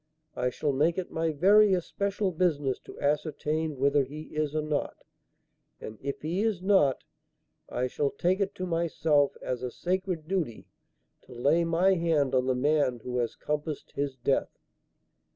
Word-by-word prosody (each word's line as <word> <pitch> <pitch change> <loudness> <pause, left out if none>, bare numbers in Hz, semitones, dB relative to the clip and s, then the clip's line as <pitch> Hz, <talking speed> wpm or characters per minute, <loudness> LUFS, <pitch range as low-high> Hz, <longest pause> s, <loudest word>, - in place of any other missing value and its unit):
I 125 - 0
shall 140 +3 -1
make 155 +5 +2
it 185 - -3
my 165 0 0
very 200 +6 +5
especial 200 +2 -1
business 150 -6 0
to - - -11
ascertain 150 +1 -1
whether 140 +1 +3
he 145 +4 -8
is 155 -1 -1
or 155 - 0
not. 150 -1 -2 0.8
And 110 0 -9
if 140 +1 -5
he 170 +5 -1
is 215 -4 0
not, 185 -8 +3 0.7
I 125 - -1
shall 140 +3 0
take 185 +6 0
it 200 -1 -1
to 185 - -4
myself 165 -4 +1
as 125 -1 -3
a 125 - -3
sacred 180 +1 -2
duty 170 - -2 0.6
to - - -13
lay 145 +8 +3
my 175 +4 +3
hand 160 -6 +1
on 130 0 +2
the 130 - +2
man 135 -2 +1
who 125 0 -2
has 120 -1 -1
compassed 150 0 -4
his 140 -1 -2
death." 130 +2 -1
155 Hz, 165 wpm, -28 LUFS, 140-175 Hz, 0.8 s, very